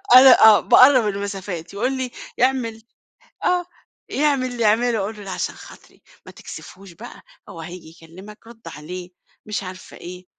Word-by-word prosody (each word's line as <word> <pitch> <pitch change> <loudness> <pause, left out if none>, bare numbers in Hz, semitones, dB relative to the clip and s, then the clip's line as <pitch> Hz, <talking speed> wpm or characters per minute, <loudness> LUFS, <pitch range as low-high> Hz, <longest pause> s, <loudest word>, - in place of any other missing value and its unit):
أنا 255 -3 +8
آه 215 -1 +8
باقرّب 255 -4 +5
المسافات 195 -4 -5
يقول 250 +6 -1
لي 255 -1 -4 0.3
يعمل 240 -3 0 0.6
آه، 360 -1 +1 0.4
يعمل 280 -3 +1
اللي 235 -2 -3
يعمله 230 +2 +2
أقول 210 +2 -4
له 205 - -10
لأ 195 - -7
عشان 180 - -4
خاطري، - - -16 0.2
ما - - -11
تكسفهوش 195 -1 -12
بقى، 170 - -12 0.3
هو 165 - -9
هييجي 175 0 -10
يكلِّمك 190 +6 -13
رُدّ 230 -1 -15
عليه، 175 +4 -8 0.4
مش 210 -2 -4
عارفة 185 0 -10
إيه، 180 +1 -10
210 Hz, 155 wpm, -21 LUFS, 185-245 Hz, 0.6 s, أنا